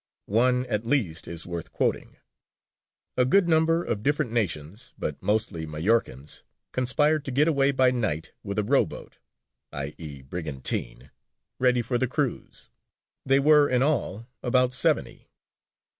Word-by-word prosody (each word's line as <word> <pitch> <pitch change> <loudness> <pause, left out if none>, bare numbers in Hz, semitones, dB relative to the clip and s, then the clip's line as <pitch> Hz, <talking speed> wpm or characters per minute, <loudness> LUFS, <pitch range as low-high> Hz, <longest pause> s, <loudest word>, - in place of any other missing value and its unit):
One 125 +4 +2
at 110 -3 -2
least 115 - -1
is 85 -1 -5
worth 85 -2 -6
quoting: - - -2 1.0
"A 125 - +5
good 175 +9 +3
number, 165 +1 +3
of 105 - -2
different 145 0 0
nations, 100 - -3
but 75 - -4
mostly 105 -7 -1
Majorcans, 75 - -1 0.3
conspired 150 +4 +2
to - - -4
get 145 +5 +3
away 140 -4 +3
by 130 -2 +3
night 110 -11 -2
with 100 -1 -5
a 105 - +2
row 135 +7 +3
boat - - -11 0.5
[i.e., 70 0 -7
brigantine] 65 -5 -5 0.5
ready 125 -1 +3
for 120 +1 -1
the 130 - +1
cruise: 135 0 -4 0.6
they 135 +1 +5
were 150 0 +5
in 125 0 +2
all 115 -7 -1 0.2
about 125 0 +2
seventy. 125 - 0
120 Hz, 140 wpm, -26 LUFS, 85-135 Hz, 1.0 s, A